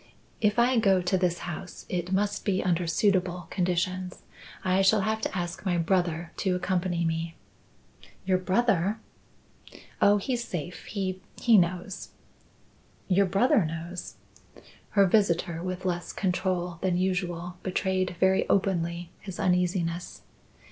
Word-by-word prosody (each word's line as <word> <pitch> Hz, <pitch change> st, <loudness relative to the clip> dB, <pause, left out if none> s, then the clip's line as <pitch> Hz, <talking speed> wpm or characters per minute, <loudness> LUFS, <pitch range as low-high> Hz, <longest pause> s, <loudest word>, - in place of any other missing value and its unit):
If 210 Hz, 0 st, +2 dB
I 240 Hz, +1 st, +4 dB
go 195 Hz, -4 st, +4 dB
to 180 Hz, +2 st, 0 dB
this 180 Hz, -2 st, +1 dB
house 175 Hz, +1 st, -7 dB
it 180 Hz, 0 st, -3 dB
must 205 Hz, +1 st, 0 dB
be 190 Hz, -2 st, 0 dB
under 175 Hz, -1 st, +1 dB
suitable 180 Hz, -1 st, +1 dB
conditions. 180 Hz, 0 st, -1 dB, 0.4 s
I 185 Hz, +1 st, +3 dB
shall 195 Hz, +2 st, +4 dB
have 220 Hz, +1 st, -1 dB
to -, -, -2 dB
ask 175 Hz, 0 st, -4 dB
my 180 Hz, -3 st, +1 dB
brother 170 Hz, -1 st, 0 dB
to 190 Hz, -2 st, +1 dB
accompany 180 Hz, -1 st, 0 dB
me." 165 Hz, 0 st, -2 dB, 0.9 s
"Your 185 Hz, -1 st, +2 dB
brother!" 195 Hz, 0 st, +1 dB, 1.0 s
"Oh, 205 Hz, +1 st, +6 dB
he's 240 Hz, +3 st, -2 dB
safe. 175 Hz, -4 st, -6 dB
He 190 Hz, -2 st, -3 dB, 0.2 s
he 235 Hz, -2 st, +5 dB
knows." 180 Hz, 0 st, +1 dB, 1.0 s
"Your 195 Hz, +1 st, +4 dB
brother 200 Hz, +2 st, +3 dB
knows?" 165 Hz, +3 st, -5 dB, 0.8 s
Her 200 Hz, -, +7 dB
visitor, 175 Hz, -4 st, +2 dB
with 185 Hz, +1 st, -4 dB
less 175 Hz, -1 st, -2 dB
control 180 Hz, -2 st, -1 dB
than 185 Hz, -2 st, +1 dB
usual, 180 Hz, -1 st, -2 dB
betrayed 185 Hz, -1 st, -1 dB
very 190 Hz, 0 st, +3 dB
openly 170 Hz, -3 st, 0 dB
his 190 Hz, -2 st, -8 dB
uneasiness. 180 Hz, -1 st, 0 dB
185 Hz, 130 wpm, -27 LUFS, 175-195 Hz, 1.0 s, Her